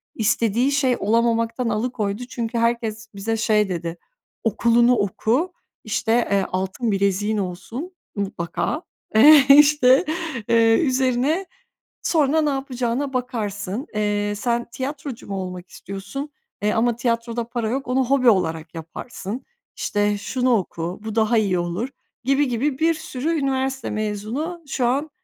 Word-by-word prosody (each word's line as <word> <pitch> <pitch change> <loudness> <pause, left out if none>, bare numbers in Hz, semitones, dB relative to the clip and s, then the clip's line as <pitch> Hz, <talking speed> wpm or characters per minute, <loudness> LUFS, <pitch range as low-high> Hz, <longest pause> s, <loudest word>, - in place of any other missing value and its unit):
istediği 230 +4 +2
şey 265 -3 +2
olamamaktan 230 +2 +1
alıkoydu 215 -1 -2
çünkü 235 -1 -3
herkes 230 -2 -1
bize 225 +3 -2
şey 210 -2 +2
dedi, 170 -1 -4 0.5
“Okulunu 235 +2 +4
oku,” 230 - 0 0.3
işte, 220 +1 -1 0.2
eee, 195 -1 +2
“Altın 190 +5 -1
bileziğin 200 +2 +1
olsun 205 - -5 0.2
mutlaka.” 195 - -2 0.3
Eee, 280 +4 +8
işte, 285 0 +7 0.4
eee, 225 -1 +5
üzerine 265 +5 +1 0.6
“Sonra 315 -1 +2
ne 300 - +2
yapacağına 270 0 -2
bakarsın, 225 - -3
eee, 205 0 0
sen 235 +2 0
tiyatrocu 270 0 -5
mu 195 - -4
olmak 180 -1 -6
istiyorsun? 200 +10 -7 0.3
E, 210 +1 +1
ama 235 +1 +2
tiyatroda 235 -1 -1
para 235 -3 -2
yok, 270 +2 -2
onu 255 0 +2
hobi 255 -2 +4
olarak 165 -5 0
yaparsın.” 195 +7 -7 0.3
İşte, 205 0 0
“Şunu 250 +4 0
oku, 175 -1 -4
bu 220 -1 -5
daha 225 +1 +3
iyi 190 -5 +2
olur.” 175 +9 -2 0.3
gibi 275 +2 +2
gibi 260 +3 -1
bir 330 +1 +3
sürü 305 -1 -4
üniversite 265 -1 -1
mezunu 215 - -3
şu 255 -2 -1
an, 280 +6 0
230 Hz, 130 wpm, -22 LUFS, 205-265 Hz, 0.6 s, Eee